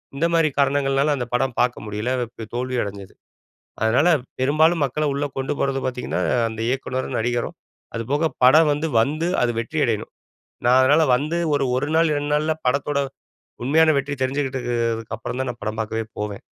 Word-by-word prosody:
இந்த 145 +4 +1
மாதிரி 165 -2 +4
காரணங்கள்னால 140 +1 +2
அந்த 125 - -2
படம் 130 -1 -1
பார்க்க 120 -3 -1
முடியல, 105 +3 -3 0.3
பி 115 - -6
தோல்வி 125 +1 -2
அடைஞ்சது. 100 -1 -8 0.7
அதனால 125 +10 +3 0.3
பெரும்பாலும் 155 +4 +3
மக்களை 150 +3 -1
உள்ள 140 +1 -1
கொண்டு 135 +2 -1
போறது 135 -1 0
பாத்தீங்கன்னா 125 -1 -3 0.3
,அந்த 110 0 -7
இயக்குனரும் 130 0 -2
நடிகரும். 120 +1 -2 0.4
அதுபோக 140 +8 -1 0.2
படம் 155 +4 +7
வந்து, 150 +3 -1
வந்து 155 +8 0 0.2
அது 120 - +2
வெற்றியடையணும். 120 -4 -1 0.6
நான் 125 +1 +6
அதுனால 145 +5 +5
வந்து 155 +5 -2 0.2
ஒரு 140 - +1
1 140 +3 -1
நாள், 165 -1 +4
2 145 0 -2
நாள்ல 155 +1 +1
படத்தோட, 140 +2 +1 0.7
உண்மையான 155 +4 +4
வெற்றியை 140 0 -2
தெரிஞ்சுக்கிட்டதுக்கு 130 -2 -1 0.2
அதுக்கு 115 0 -5
அப்புறம் 125 +3 -5
தான் 130 - -2
நான் 120 - -17
படம் 110 +1 -3
பாக்கவே 110 +1 -3 0.2
போவேன். 105 -1 -4
135 Hz, 165 wpm, -22 LUFS, 120-145 Hz, 0.7 s, படம்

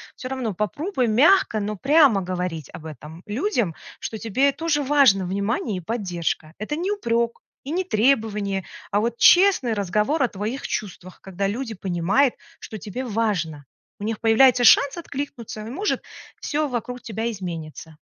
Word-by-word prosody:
Всё 255 - -7
равно 255 -5 -3
попробуй 255 - -1
мягко, 260 - +4
но 210 +1 -3
прямо 275 - +4
говорить 180 -4 -4
об 160 - -10
этом 155 +3 -10
людям, 230 - -1 0.3
что 220 - -5
тебе 260 +7 +2
тоже 295 0 -1
важно 265 -9 +4
внимание 200 +2 -2
и - - -5
поддержка. 175 -6 -3
Это 215 +8 -3
не 360 +6 -2
упрек 235 - -1 0.2
и 275 - -6
не 365 +3 0
требование, 215 - +1 0.3
а 205 - +2
вот 235 +2 -1
честный 355 - +5
разговор 210 - 0
о - - +3
твоих 215 +5 -4
чувствах, 185 -3 -6
когда 195 +1 -3
люди 230 +3 -3
понимают, 195 +7 +1 0.2
что 215 - -8
тебе 210 +6 -6
важно. 195 - -2 0.3
У - - -7
них 220 0 -2
появляется 245 +2 +5
шанс 280 +5 +6
откликнуться 280 -8 -6
и 215 - -7
может 395 - -2 0.4
всё 300 0 -1
вокруг 250 -1 -4
тебя 225 -1 -3
изменится. 165 -5 -7
225 Hz, 155 wpm, -23 LUFS, 195-270 Hz, 0.4 s, шанс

